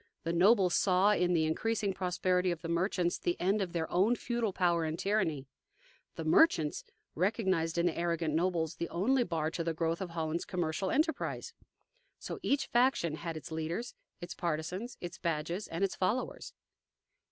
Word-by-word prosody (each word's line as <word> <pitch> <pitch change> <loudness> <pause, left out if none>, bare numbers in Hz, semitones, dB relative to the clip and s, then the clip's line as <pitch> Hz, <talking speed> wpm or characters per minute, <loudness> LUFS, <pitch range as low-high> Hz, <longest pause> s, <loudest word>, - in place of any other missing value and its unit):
The 165 - -1
nobles 185 +1 +4
saw 190 +2 +4
in 180 -3 +2
the 160 -2 +3
increasing 205 +5 0
prosperity 180 0 0
of 175 0 -3
the - - -3
merchants 175 +1 0
the 175 - -1
end 195 +4 +1
of 185 -3 -2
their 165 -2 -2
own 200 +7 +3
feudal 235 -3 -1
power 175 -3 +1
and 160 0 -2
tyranny. 180 -10 0 0.7
The 165 - -5
merchants 160 - +3 0.3
recognized 185 -3 0
in 170 - +2
the 175 - +1
arrogant 170 -2 -1
nobles 165 -1 0
the 170 - -3
only 245 +10 +2
bar 160 -6 -2
to 170 - -3
the 165 -1 -2
growth 165 +1 -1
of 190 - -3
Holland's 165 0 -2
commercial 175 +1 -2
enterprise. 320 - -1 0.6
So - - -6
each 280 - +1
faction 240 - +2
had 165 +1 -5
its 155 +1 -9
leaders, 165 +9 -3 0.3
its 175 0 -6
partisans, 175 +9 -3
its 175 0 -7
badges, 170 +3 -2
and 165 +4 -3
its 195 - +1
followers. 210 +7 -2
175 Hz, 170 wpm, -32 LUFS, 165-195 Hz, 0.7 s, nobles